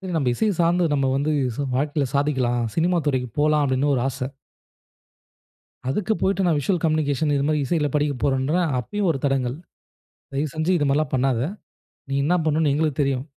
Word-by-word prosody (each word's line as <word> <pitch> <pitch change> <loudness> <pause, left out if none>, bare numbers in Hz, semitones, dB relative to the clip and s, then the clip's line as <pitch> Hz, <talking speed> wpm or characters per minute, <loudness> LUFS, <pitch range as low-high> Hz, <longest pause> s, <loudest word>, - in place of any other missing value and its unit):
நம்ம 140 -5 +1
இசைய 215 - +1
சார்ந்து, 175 +1 +3
நம்ம 140 -2 +1
வந்து 145 +3 0 0.2
சு 145 - -2
வாழ்க்கையில 145 +1 0
சாதிக்கலாம். 130 -4 +1
சினிமா 175 +2 +2
துறைக்கு 130 -3 0
போலா, 150 +1 +3
அப்டினு 140 +1 +1
ஒரு 125 - 0
ஆச. 130 0 -4 1.6
அதுக்கு 210 +9 0
போய்ட்டு, 195 0 +1
நான் 165 -4 +2
விசுவல் 160 +5 0
கம்யூனிகேஷன் 155 -2 +1
இது 140 - +1
மாரி 150 -1 +1
இசையில 150 0 +1
படிக்கப் 145 -3 0
போறேன்ற 135 +3 +1 0.2
அப்பயும் 205 - -2
ஒரு 135 - -3
தடங்கல். 135 -2 0 0.8
தயவுசெஞ்சு, 155 +5 -1
இதுமாரிலா 145 +1 +1
பண்ணாத. 130 -2 +1 0.7
நீ 135 - -1
என்னா 175 +5 +2
பண்ணணுனு 155 -1 +2
எங்களுக்கு 150 -1 0
தெரியும். 135 -2 0
145 Hz, 155 wpm, -23 LUFS, 135-155 Hz, 1.6 s, சார்ந்து